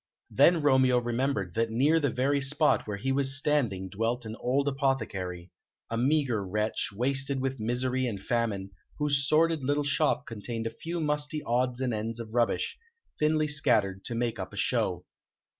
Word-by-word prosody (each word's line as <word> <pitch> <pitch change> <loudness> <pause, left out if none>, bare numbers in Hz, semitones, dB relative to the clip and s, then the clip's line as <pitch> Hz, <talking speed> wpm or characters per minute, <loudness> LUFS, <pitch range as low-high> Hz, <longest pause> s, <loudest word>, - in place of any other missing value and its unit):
Then 160 +3 +4
Romeo 130 -3 +4
remembered 120 -6 -1
that 115 0 0
near 140 +8 +3
the 145 -3 +1
very 135 +4 0
spot 150 0 +2
where 105 -1 -3
he 135 +6 -2
was 135 0 +2
standing 125 -10 0
dwelt 115 +5 -2
an 110 0 -6
old 135 +3 0
apothecary 95 - -2 0.4
a 115 - -1
meagre 130 -5 +1
wretch, 105 +3 -1
wasted 135 +5 0
with 135 0 -2
misery 125 +3 0
and 105 -5 -4
famine, 100 -3 -2 0.3
whose 145 -2 +1
sordid 160 0 +3
little 145 +2 +1
shop 145 0 +1
contained 115 +1 -5
a 115 - -3
few 170 +1 -5
musty 150 0 -1
odds 125 +1 0
and 125 -2 0
ends 110 +2 -3
of 110 -1 -8
rubbish, 120 -1 0 0.4
thinly 155 0 +2
scattered 115 -10 +1
to 120 - -2
make 115 -1 -2
up - - -6
a - - -9
show. - - 0
130 Hz, 170 wpm, -28 LUFS, 115-140 Hz, 0.4 s, Then